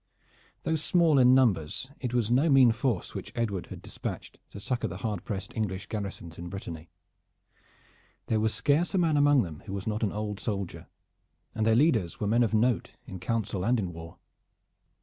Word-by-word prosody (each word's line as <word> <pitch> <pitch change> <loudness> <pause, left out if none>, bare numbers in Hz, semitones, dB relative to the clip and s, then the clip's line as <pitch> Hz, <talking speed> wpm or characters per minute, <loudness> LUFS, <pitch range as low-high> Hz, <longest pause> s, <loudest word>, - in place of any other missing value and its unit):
Though 160 - +1
small 160 -2 +3
in 125 0 +7
numbers, 115 - +1
it 125 -3 -3
was 120 -2 0
no 140 +7 +4
mean 135 -4 +7
force 120 -4 -1
which - - -6
Edward 105 -6 -2
had - - -9
dispatched - - -6
to 100 - -9
succor 125 +4 -2
the - - -6
hard 105 -5 -2
pressed 100 -2 -5
English 100 -4 -2
garrisons 100 -6 -6
in 85 0 -6
Brittany. 85 -4 -7 1.4
There 110 - +1
was 110 0 +1
scarce 155 - +1
a - - +3
man 165 -4 +3
among 145 -2 +5
them 80 -5 -8
who 95 - -5
was 100 -1 -4
not 110 0 -2
an 105 -4 +1
old 105 -1 -4
soldier, 100 -5 -4 0.7
and 110 0 0
their 110 - +5
leaders 115 - +2
were 105 - -1
men 115 +4 +3
of 115 - +2
note 115 +2 +1
in 95 - -8
council 100 -1 -2
and 120 +3 +2
in 90 -4 -3
war. 80 0 -10
110 Hz, 190 wpm, -28 LUFS, 95-125 Hz, 1.4 s, in